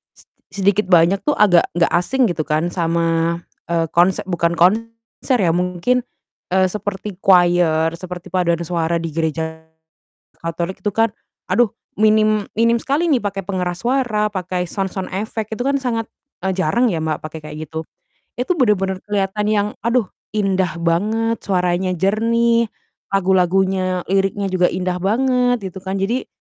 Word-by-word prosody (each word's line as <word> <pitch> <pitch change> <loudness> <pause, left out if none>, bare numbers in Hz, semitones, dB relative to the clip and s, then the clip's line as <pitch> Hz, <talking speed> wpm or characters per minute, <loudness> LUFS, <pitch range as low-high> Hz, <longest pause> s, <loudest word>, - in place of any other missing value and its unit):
seti - - -21 0.2
sedikit 200 +1 +1
banyak 180 +2 +4
tuh 295 - +3
agak 185 -5 +5
nggak 170 -2 +2
asing 210 +10 +1
gitu 155 -3 -3
kan 160 +3 0
sama, 165 -1 0 0.3
eee, 165 -1 +1
konse 175 +2 +3
bukan 170 -2 0
konser 230 +7 0
ya 165 - +3
mungkin, 180 +8 +1 0.6
eee, 190 0 +4
seperti 205 -2 -5
choir, 175 -4 +4
seperti 180 -1 -8
paduan 170 -2 +1
suara 170 0 -1
di 165 -1 -3
gereja 160 0 -3 0.7
Katolik 170 +2 -4
itu 205 - +2
kan, 225 0 +3 0.4
aduh 240 -3 +3 0.3
minim 215 -1 +3
minim 230 +1 +4
sekali 310 +5 0
nih 260 -5 +3
pakai 200 -1 -3
pengeras 180 -3 -3
suara, 240 -5 +1
pakai 180 -2 -3
sound 195 -1 -3
sound 190 -1 -4
effect, 215 +2 -3
itu 230 - -4
kan 275 0 +2
sangat, 230 -3 -1 0.4
eee, 190 - +1
jarang 190 +8 +2
ya 160 - -2
Mbak, 155 -1 -2
pakai 155 +1 -7
kayak 150 - -8
gitu. 160 0 -4 0.6
Itu 260 +9 0
bener-bener 195 -7 +1
kelihatan 205 0 -1
yang, 205 0 +2 0.2
aduh, 235 -4 +1 0.3
indah 190 -5 0
banget, 215 +7 +1
suaranya 180 -1 0
jernih, 230 +5 +2 0.5
lagu-lagunya 185 -1 +2
liriknya 195 +1 +1
juga 180 -1 +3
indah 180 0 -2
banget 245 +2 +2
gitu 190 - -9
kan. 190 0 -4
Jadi 235 +7 -1
190 Hz, 150 wpm, -19 LUFS, 175-215 Hz, 0.7 s, agak